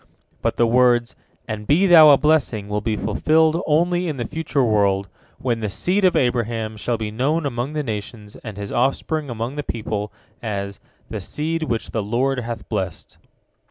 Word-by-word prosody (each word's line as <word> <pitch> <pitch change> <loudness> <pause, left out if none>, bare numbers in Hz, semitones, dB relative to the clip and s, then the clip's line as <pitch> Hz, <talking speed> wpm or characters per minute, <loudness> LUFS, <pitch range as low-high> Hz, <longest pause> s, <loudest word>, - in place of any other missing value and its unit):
But - - 0
the 120 - +4
words, 120 +1 +3 0.3
"And 110 -2 -5
be 165 +7 +4
thou 165 -4 +9
a 140 - +8
blessing," 135 -8 +1
will 105 0 -2
be 110 0 -1
fulfilled 155 - +2
only 175 +3 +2
in 150 -4 -3
the 120 - -3
future 150 0 -1
world, 100 -3 +2 0.3
when 125 -3 -1
the 110 -2 -2
seed 185 - 0
of 185 - +4
Abraham 115 -3 0
shall 115 +2 -2
be 110 -1 -4
known 145 +8 0
among 130 +1 -3
the 150 -1 -1
nations 105 -2 -6
and 110 -4 -9
his 100 -1 -6
offspring 140 +4 0
among 120 +4 -4
the - - 0
peoples 105 -3 -3 0.3
as 100 -3 -4 0.3
"the 110 -2 -4
seed 160 - -3
which 120 -8 -2
the 110 - -1
Lord 125 +6 0
hath 115 -2 -6
blessed." 95 -6 -4
120 Hz, 180 wpm, -21 LUFS, 110-150 Hz, 0.3 s, thou